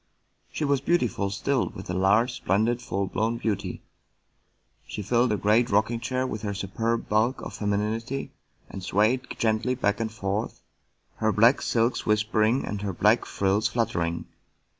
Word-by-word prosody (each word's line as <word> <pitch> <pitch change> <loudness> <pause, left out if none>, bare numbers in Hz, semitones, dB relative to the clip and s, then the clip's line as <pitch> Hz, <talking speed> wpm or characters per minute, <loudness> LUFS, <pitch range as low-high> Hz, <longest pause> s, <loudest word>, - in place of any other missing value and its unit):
She 155 - -2
was 140 -2 +1
beautiful 125 - +1
still, 130 +6 0
with 95 - -10
a 90 - -3
large, 105 +7 +3
splendid, 115 +2 0
full 100 -5 -2
blown 110 +5 -1
beauty; 110 -4 -3 1.0
she 105 - -5
filled 120 +3 +2
a 105 - +1
great 110 +5 +3
rocking 115 +2 +1
chair 130 +2 -1
with 110 -4 -4
her 100 -2 -3
superb 115 +4 -2
bulk 110 +5 +1
of - - -7
femininity, 110 +6 -2 0.4
and 95 - -8
swayed 110 +7 +1
gently 115 +3 +1
back 105 -4 0
and 110 -1 -2
forth, 100 0 -3 0.5
her 110 0 +1
black 115 +5 +4
silks 115 +1 +1
whispering 110 +3 +2
and 105 -1 -4
her 100 -2 -3
black - - +3
frills 100 +3 +1
fluttering. 105 -8 -1
110 Hz, 155 wpm, -26 LUFS, 100-120 Hz, 1.0 s, black